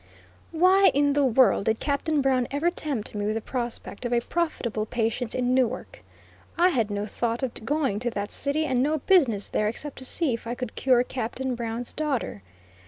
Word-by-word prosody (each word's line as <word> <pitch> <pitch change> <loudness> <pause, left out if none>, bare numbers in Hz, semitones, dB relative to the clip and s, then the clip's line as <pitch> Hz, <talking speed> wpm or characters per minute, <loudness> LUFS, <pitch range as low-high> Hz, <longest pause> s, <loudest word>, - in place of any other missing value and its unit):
Why 370 +4 +5
in 285 0 +3
the 290 0 +2
world 255 -5 +4
did 220 0 +1
Captain 290 +1 0
Brown 255 -2 +2
ever 300 +5 0
tempt 280 - -3
me 205 -1 -2
with 215 - -1
the - - 0
prospect 240 -2 -5
of 240 - -3
a 240 - +3
profitable 235 -7 -2
patient 230 0 -1
in 250 0 +1
Newark? 255 -1 -1 0.6
I 355 +2 +5
had 230 - 0
no 205 0 -2
thought 235 +3 -2
of 255 - -2
going 270 -5 0
to 240 +1 -1
that 205 -2 -4
city, 290 +3 +1
and 255 -4 +1
no 300 +4 +1
business 265 - +3
there 210 - 0
except 275 +6 -4
to - - -8
see 295 0 +2
if 230 0 -6
I 240 - -3
could 250 -3 -5
cure 250 -2 +3
Captain 255 +1 -3
Brown's 235 0 -4
daughter. 280 - -2
250 Hz, 195 wpm, -26 LUFS, 230-285 Hz, 0.6 s, Why